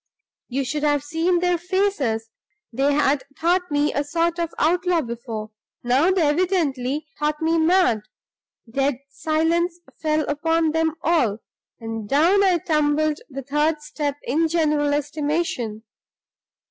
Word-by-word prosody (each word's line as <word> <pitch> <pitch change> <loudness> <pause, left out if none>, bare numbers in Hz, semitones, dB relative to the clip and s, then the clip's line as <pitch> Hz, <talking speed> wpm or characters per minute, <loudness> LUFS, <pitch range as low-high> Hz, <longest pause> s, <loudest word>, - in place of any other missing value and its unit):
You 265 +2 -2
should 295 +3 -2
have 290 -1 +1
seen 330 +4 0
their 355 -1 +1
faces! 340 - -1 0.4
They 275 +4 +2
had 285 -1 +2 0.2
thought 355 +2 +1
me 290 0 +1
a 285 - 0
sort 335 +3 0
of 335 -1 -1
outlaw 350 +1 +2
before; 230 -3 -6 0.3
now 260 +8 +3
they 375 -3 +2
evidently 295 -4 0
thought 300 0 0
me 325 +1 +1
mad. 320 - +3 0.7
Dead 270 +4 0 0.2
silence 330 +4 0 0.2
fell 310 -1 +1
upon 325 +2 +1
them 320 0 0
all; 255 -12 +2 0.4
and 225 -2 -6
down 345 +8 +4
I 370 -3 +4
tumbled 305 -1 +1
the 275 -1 -6
third 300 +3 0
step 295 -2 -3
in 300 +5 0
the 325 - +2
general 300 -3 +1
estimation. 290 -7 -2
305 Hz, 135 wpm, -23 LUFS, 275-335 Hz, 0.7 s, down